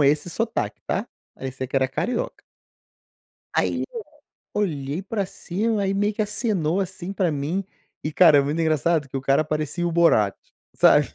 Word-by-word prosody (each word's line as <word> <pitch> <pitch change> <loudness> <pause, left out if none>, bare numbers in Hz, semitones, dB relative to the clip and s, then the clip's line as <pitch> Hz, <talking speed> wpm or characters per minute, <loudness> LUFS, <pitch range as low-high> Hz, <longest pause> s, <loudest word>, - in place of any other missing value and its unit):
com 145 - +5
esse 150 +4 +2
sotaque, 220 - -2
tá? - - -1 0.3
Parecia 130 0 -5
que 135 - -2
era 130 -1 +3
carioca. 240 - -2 1.1
Aí, - - +1
eu 460 - -4 0.5
olhei 155 -5 -1
para 200 0 -2
cima, 205 +3 -1
aí 195 0 +1
meio 205 +2 +1
que 215 - -1
acenou 200 -5 0
assim 190 0 -5
para 185 -5 +1
mim. 150 +7 -1 0.4
E, 155 - -2
cara, 160 -2 +7
é - - +6
muito 145 +4 -1
engraçado 160 -1 +2
que - - -8
o - - -4
cara 135 +3 +3
parecia 155 +3 -2
o - - -1
Borat, 160 -12 +4 0.4
sabe. - - +6
165 Hz, 170 wpm, -24 LUFS, 145-195 Hz, 1.1 s, cara